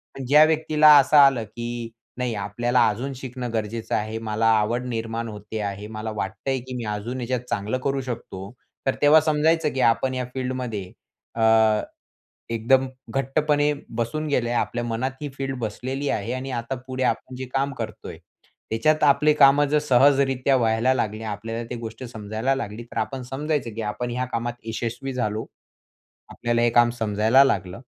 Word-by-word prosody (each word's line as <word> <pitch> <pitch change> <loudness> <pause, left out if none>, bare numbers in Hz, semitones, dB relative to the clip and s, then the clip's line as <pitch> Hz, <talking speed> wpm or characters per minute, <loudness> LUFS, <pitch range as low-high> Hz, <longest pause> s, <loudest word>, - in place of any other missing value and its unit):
पण 135 - -6
ज्या 150 +3 +7
व्यक्तीला 155 -1 +5
असं 145 +2 +4
आलं 135 -5 +6
की 120 +2 -6 0.3
नाही 125 -2 -1
आपल्याला 120 +5 +1
अजून 130 +6 -4
शिकणं 125 -1 -6
गरजेचं 110 0 -2
आहे, 110 +1 -2
मला 110 0 -2
आवड 120 +4 -1
निर्माण 115 0 -3
होते 105 +1 -7
आहे, 100 0 -4
मला 110 0 -5
वाटतय 110 +7 -3
की 130 - -6
मी 120 - -5
अजून 120 +5 -5
याच्यात 125 +1 -1
चांगलं 110 +2 -1
करू 135 -1 0
शकतो, 115 -6 -7 0.4
तर 135 - +2
तेव्हा 150 +2 +7
समजायचं 155 0 +2
की 135 - -3
आपण 130 +2 -3
या 125 -1 -2
फील्डमध्ये 125 -7 -4 0.4
अ, 115 - -2 1.1
एकदम 130 +4 +2 0.2
घट्टपणे 145 +4 +1 0.3
बसून 155 +7 -2
गेलंय. 120 -4 0
आपल्या 120 0 -1
मनात 120 +3 -2
ही 145 - -3
फील्ड 135 -1 -3
बसलेली 130 +6 -3
आहे 105 +3 -2
आणि 130 +1 -4
आता 115 +3 -5
पुढे 130 0 -4
आपण 125 +1 -2
जे 130 - -5
काम 135 +1 0
करतोय - - -7 0.5
त्याच्यात 155 +8 +2
आपले 150 +1 +5
कामं 140 0 +6
जर 150 +1 +3
सहजरित्या 135 -1 +3
व्हायला 115 +1 +2
लागले, 110 -3 -2
आपल्याला 115 +2 -4
ती - - -3
गोष्ट 115 +1 -8
समजायला 110 +2 -2
लागली, 110 -4 -5
तर 120 - -7
आपण 130 +4 -3
समजायचं, 135 +1 -2
की 115 - -4
आपण 120 +3 -4
ह्या 125 +1 -1
कामात 120 +1 -2
यशस्वी 120 +4 -4
झालो. 110 -3 -2 0.9
आपल्याला 120 0 -1
हे 120 - +3
काम 120 0 +4
समजायला 110 +4 +4
लागलं. 95 -3 -1
120 Hz, 165 wpm, -24 LUFS, 110-135 Hz, 1.1 s, ज्या